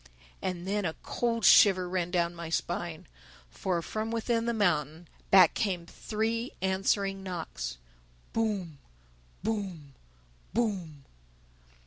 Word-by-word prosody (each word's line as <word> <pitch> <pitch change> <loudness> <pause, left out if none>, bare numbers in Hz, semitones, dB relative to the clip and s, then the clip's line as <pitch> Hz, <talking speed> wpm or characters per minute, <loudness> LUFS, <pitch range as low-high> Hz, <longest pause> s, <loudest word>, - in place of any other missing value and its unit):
And 180 -1 -3
then 205 +1 0
a 160 -3 -2
cold 230 -3 -1
shiver 185 -3 +7
ran 180 -1 -1
down 175 -1 +1
my 170 -1 -7
spine. 170 0 -2 0.5
For, 170 - -1
from 220 +4 -3
within 230 0 0
the - - +2
mountain, 165 -5 0 0.2
back 185 -4 +7
came 185 -5 -1
three 225 +6 -2
answering 195 +1 0
knocks: 160 - -5 0.6
_Boom!... 200 -9 -1 0.7
Boom!... 190 -10 -3 0.6
Boom! 185 -11 -1
185 Hz, 110 wpm, -30 LUFS, 170-215 Hz, 0.7 s, shiver